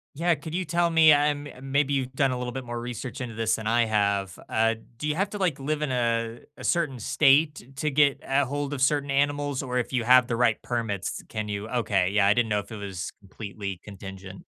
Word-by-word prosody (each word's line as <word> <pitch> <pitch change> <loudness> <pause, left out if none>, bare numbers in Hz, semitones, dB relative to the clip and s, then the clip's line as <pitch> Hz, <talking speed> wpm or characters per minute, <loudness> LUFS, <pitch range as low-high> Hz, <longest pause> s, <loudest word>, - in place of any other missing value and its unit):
Yeah, 170 +4 +2
could 155 +3 -7
you 185 0 -1
tell 170 +1 +1
me, 160 -2 +7
I'm 145 0 +1
maybe 140 +1 +1
you've 130 -2 -1
done 135 0 +2
a 125 - -2
little 125 0 -3
bit 130 0 -6
more 120 0 -4
research 120 +1 -6
into 120 -3 -5
this 115 0 +1
than 110 -1 -5
I 115 +1 +3
have, 100 -3 0
uh, 115 0 +2 0.2
do 150 - -3
you 150 - +1
have 195 +4 0
to 210 - -4
like, 180 -8 0
live 150 +2 -2
in 145 - -1
a 115 -2 0 0.2
a - - -10
certain 155 -7 0
state 140 +2 +2
to 150 +1 -1
get 140 0 +3
ahold 140 +1 -1
of 135 - -4
certain 140 0 +2
animals 145 0 0
or 125 -2 -3
if 125 +1 -2
you 120 -3 +1
have 125 +1 +6
the 115 - -1
right 120 -2 +2
permits, 115 -6 -3
can 110 -1 -4
you 105 +1 -4
okay, 100 -7 +1
yeah, 100 0 +3
I 100 - +5
didn't 120 0 +1
know 105 -1 +1
if 100 - -9
it 110 - -6
was 95 -3 -5
completely 100 -1 -7
contingent. 95 -1 -10
125 Hz, 230 wpm, -26 LUFS, 110-145 Hz, 0.2 s, me